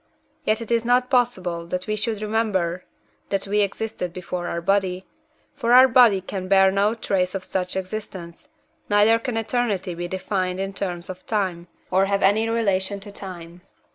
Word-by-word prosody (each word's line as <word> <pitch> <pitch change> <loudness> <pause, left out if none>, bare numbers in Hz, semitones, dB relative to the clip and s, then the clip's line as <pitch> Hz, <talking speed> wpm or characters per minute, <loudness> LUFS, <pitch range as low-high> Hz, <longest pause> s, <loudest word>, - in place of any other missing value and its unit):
Yet 215 +1 +1
it 230 - -7
is 230 -1 +2
not 250 +2 +2
possible 185 -10 0
that 180 +1 -3
we 215 - -1
should 215 0 -2
remember 200 -5 -1 0.4
that 195 -1 -1
we 205 +1 0
existed 200 -2 -3
before 180 0 -5
our 170 - -2
body, 190 0 0 0.5
for 240 -3 +1
our 255 +1 +9
body 230 -6 +5
can 185 0 -5
bear 195 0 +5
no 200 +3 +2
trace 190 -4 -1
of 190 - -3
such 185 -1 -3
existence, 190 +2 -6 0.4
neither 210 +2 +5
can 230 -1 -3
eternity 220 -5 -1
be 175 +1 -4
defined 185 0 -2
in 195 0 -3
terms 180 -3 -4
of 185 0 -9
time, 185 -5 -1 0.2
or 190 +1 +4
have 200 0 0
any 215 +3 +3
relation 200 -3 0
to 205 +1 -10
time. 175 -3 -9
195 Hz, 170 wpm, -23 LUFS, 185-220 Hz, 0.5 s, our